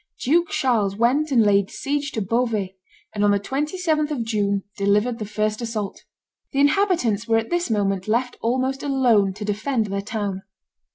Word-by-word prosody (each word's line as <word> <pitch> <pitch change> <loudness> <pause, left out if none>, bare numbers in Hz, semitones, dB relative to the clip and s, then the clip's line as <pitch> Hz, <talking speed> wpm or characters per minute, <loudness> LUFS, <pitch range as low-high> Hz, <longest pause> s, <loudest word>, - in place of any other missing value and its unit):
Duke 335 +6 +2
Charles 215 -7 +1
went 255 +8 +2
and 235 -4 +5
laid 200 -2 +3
siege 290 +1 -2
to 220 - -1
Beauvais, 215 -3 -1 0.4
and 205 -1 -1
on 205 - +4
the 200 0 +3
27th 305 - -1
of 280 -6 -2
June 200 -3 0
delivered 210 +4 +1
the 215 - -4
first 215 +1 -1
assault. 220 -4 -4 0.5
The 275 - 0
inhabitants 285 - +2
were 225 -1 +3
at 225 +5 -2
this 345 -4 0
moment 195 -3 0
left 240 +3 0
almost 260 +3 0
alone 245 -9 +2
to 210 0 -6
defend 215 +3 -1
their 200 -1 -3
town. 200 -2 -3
225 Hz, 170 wpm, -23 LUFS, 205-270 Hz, 0.5 s, and